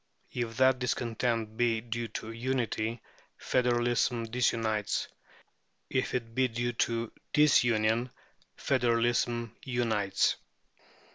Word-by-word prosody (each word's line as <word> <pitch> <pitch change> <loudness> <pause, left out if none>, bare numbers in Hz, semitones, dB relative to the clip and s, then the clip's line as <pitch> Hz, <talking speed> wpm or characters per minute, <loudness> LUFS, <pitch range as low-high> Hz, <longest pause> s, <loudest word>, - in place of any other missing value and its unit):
If 115 -2 -3
that 130 -1 +4
discontent 115 -2 -1
be 120 -2 +2
due 115 +1 -4
to 110 +1 -6
unity, 115 -2 -2 0.3
federalism 120 -1 +1
disunites; 115 -3 0 0.8
if 130 - 0
it 115 -2 -3
be 130 +2 +2
due 120 +1 -2
to 115 0 -1 0.2
disunion, 120 -5 +4 0.5
federalism 120 -2 +1
unites. 110 -6 +1
120 Hz, 90 wpm, -30 LUFS, 115-125 Hz, 0.8 s, that